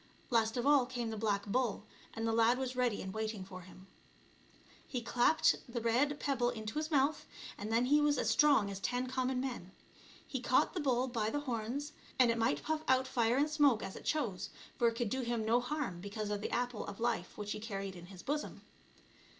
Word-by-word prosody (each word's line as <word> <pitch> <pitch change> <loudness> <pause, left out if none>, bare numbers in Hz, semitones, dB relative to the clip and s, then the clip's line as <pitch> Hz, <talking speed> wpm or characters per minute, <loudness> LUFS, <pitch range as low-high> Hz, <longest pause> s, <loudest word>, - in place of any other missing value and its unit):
Last 225 0 +2
of 240 - -1
all 285 -3 +5
came 240 -3 -3
the - - -3
black 205 -2 0
bull, 225 -1 -1 0.3
and 225 - -2
the 225 - +1
lad 230 +2 +4
was 260 -1 -3
ready 245 -4 0
and 190 0 -6
waiting 220 -3 -3
for 185 -1 -9
him. 185 +1 -14 1.0
He 250 - -2
clapped 245 +6 +3
the 235 0 -3
red 255 +6 +1
pebble 255 -4 +1
into 220 +2 -4
his 310 0 -3
mouth, 290 0 +1 0.3
and 210 +2 -5
then 230 +2 +3
he 295 +3 +4
was 295 -1 +3
as - - 0
strong 275 -9 +4
as 195 - -5
ten 245 +4 -1
common 255 0 -1
men. 245 -8 -5 0.5
He - - -3
caught - - +3
the 365 - -2
bull 260 -4 +1
by 225 -4 -1
the 290 +5 -2
horns, 255 +3 -3 0.3
and 250 -2 +5
it 230 - -1
might 230 +4 +1
puff 315 0 -1
out 260 0 +3
fire 235 0 +2
and 290 +2 +3
smoke, 290 -7 +3
as 190 - -6
it - - -9
chose, 215 -12 -1 0.3
for 235 - +3
it 230 - +1
could 230 -3 -2
do 265 - 0
him 235 -2 -1
no 230 +2 +4
harm 245 - -3
because 205 +2 -4
of 205 -1 -2
the - - -3
apple 245 -2 -1
of 200 - -7
life 230 -6 -1
which 210 0 -4
he - - -3
carried 195 -3 -5
in 175 0 -10
his 185 -1 -11
bosom. 295 +1 -3
240 Hz, 220 wpm, -34 LUFS, 215-260 Hz, 1.0 s, all